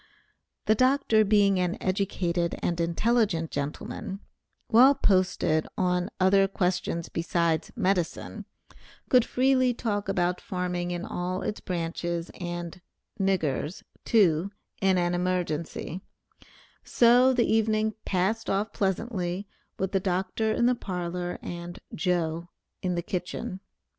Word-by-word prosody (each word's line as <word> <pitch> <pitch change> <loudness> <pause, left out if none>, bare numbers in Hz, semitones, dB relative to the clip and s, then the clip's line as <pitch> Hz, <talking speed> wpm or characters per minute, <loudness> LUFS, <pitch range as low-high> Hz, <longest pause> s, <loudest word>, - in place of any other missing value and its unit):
The 215 - +5
Dr. 255 -2 +3
being 200 -2 +4
an 180 -1 0
educated 180 -3 -1
and 170 -1 0
intelligent 170 -1 +1
gentleman, 145 +6 -4 0.5
well 260 +5 +7
posted 185 -7 +2
on 180 0 +1
other 195 +1 +5
questions 180 -3 -1
besides 165 -1 0
medicine, 185 -3 -1 0.6
could 250 -3 +6
freely 255 0 +2
talk 205 -4 -2
about 180 -2 0
farming 180 -1 -3
in 175 +1 -3
all 180 +1 -3
its 210 - -3
branches, 170 -1 -3
and 175 0 -5 0.4
"niggers" 180 -4 0 0.2
too, 185 -5 +3 0.3
in 190 -1 +3
an 175 0 +1
emergency, 175 -1 -2 0.8
so 245 +2 +5
the 245 -2 +2
evening 220 0 +2
passed 195 +5 0
off 200 +3 0
pleasantly 190 -1 -2 0.3
with 190 0 -2
the 195 - +2
Dr. 190 +4 -1
in 235 - +2
the 250 - +4
parlor, 180 -4 -4
and 175 0 -6 0.2
"Joe" 170 -1 -1 0.3
in 180 -1 -1
the 170 - -2
kitchen. 180 +1 -4
185 Hz, 120 wpm, -27 LUFS, 175-210 Hz, 0.8 s, well